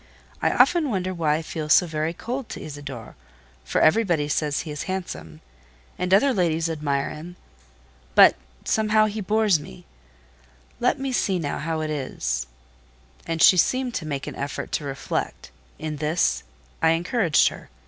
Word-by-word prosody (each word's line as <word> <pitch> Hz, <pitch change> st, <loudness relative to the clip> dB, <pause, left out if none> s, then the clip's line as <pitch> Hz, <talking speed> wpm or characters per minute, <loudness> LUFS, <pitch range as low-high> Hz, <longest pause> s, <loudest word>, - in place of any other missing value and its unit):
I -, -, +3 dB
often 335 Hz, -5 st, +3 dB
wonder 185 Hz, -4 st, -1 dB
why 160 Hz, -4 st, +1 dB
I 160 Hz, -, -3 dB
feel 155 Hz, -1 st, -5 dB
so 180 Hz, -, +6 dB
very 155 Hz, -1 st, -2 dB
cold 245 Hz, +8 st, -5 dB
to -, -, -6 dB
Isidore, 140 Hz, -7 st, -8 dB, 0.5 s
for -, -, 0 dB
everybody 170 Hz, -4 st, +3 dB
says 150 Hz, 0 st, 0 dB
he 160 Hz, -, -7 dB
is 150 Hz, -, -5 dB
handsome, 80 Hz, -, -5 dB, 0.5 s
and 180 Hz, 0 st, -3 dB
other 260 Hz, +8 st, +5 dB
ladies 165 Hz, -4 st, +1 dB
admire 145 Hz, -3 st, -1 dB
him; 170 Hz, +4 st, -9 dB, 0.8 s
but, -, -, +8 dB, 0.3 s
somehow, 215 Hz, 0 st, +3 dB
he 215 Hz, 0 st, -3 dB
bores 210 Hz, -3 st, +2 dB
me: 105 Hz, -, -12 dB, 0.9 s
let 250 Hz, +3 st, +2 dB
me 270 Hz, 0 st, -2 dB
see 195 Hz, -6 st, +1 dB
now 150 Hz, -5 st, -3 dB
how 160 Hz, +1 st, -2 dB
it 155 Hz, 0 st, -2 dB
is…." -, -, -3 dB, 0.8 s
And 165 Hz, -1 st, +1 dB
she 185 Hz, -, +8 dB
seemed 255 Hz, +7 st, +1 dB
to 160 Hz, -, -4 dB
make 140 Hz, -3 st, -3 dB
an -, -, -6 dB
effort 140 Hz, +1 st, -5 dB
to 150 Hz, -, -2 dB
reflect. 135 Hz, -1 st, -4 dB, 0.3 s
In 155 Hz, -1 st, -5 dB
this 155 Hz, +3 st, +1 dB, 0.4 s
I 160 Hz, 0 st, +4 dB
encouraged 175 Hz, 0 st, +2 dB
her. -, -, -12 dB
165 Hz, 160 wpm, -24 LUFS, 150-195 Hz, 0.9 s, but